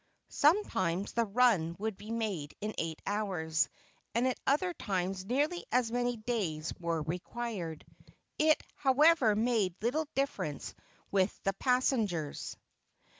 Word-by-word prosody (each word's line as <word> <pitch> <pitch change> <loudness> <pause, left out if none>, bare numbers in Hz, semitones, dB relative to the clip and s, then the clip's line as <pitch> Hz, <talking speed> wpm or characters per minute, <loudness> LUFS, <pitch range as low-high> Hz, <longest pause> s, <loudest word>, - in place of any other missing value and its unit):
Sometimes 200 - +2
the 235 0 +2
run 200 -7 +3
would 215 +1 -2
be 210 +3 -11
made 210 -10 -2
in 215 +1 -3
eight 160 -1 -3
hours, 185 -6 0 0.5
and 240 +2 +3
at 255 - -1
other 345 +6 +2
times 190 - -2
nearly 295 - 0
as 245 -2 +2
many 245 0 0
days 200 -9 -2
were 165 -2 -1
required. 180 0 -4 0.5
It, 310 0 +4
however, 275 -4 +4
made 215 -5 +1
little 290 +8 0
difference 195 - -2 0.4
with 195 0 +1
the 195 - +1
passengers. 220 - 0
215 Hz, 125 wpm, -32 LUFS, 180-250 Hz, 0.5 s, It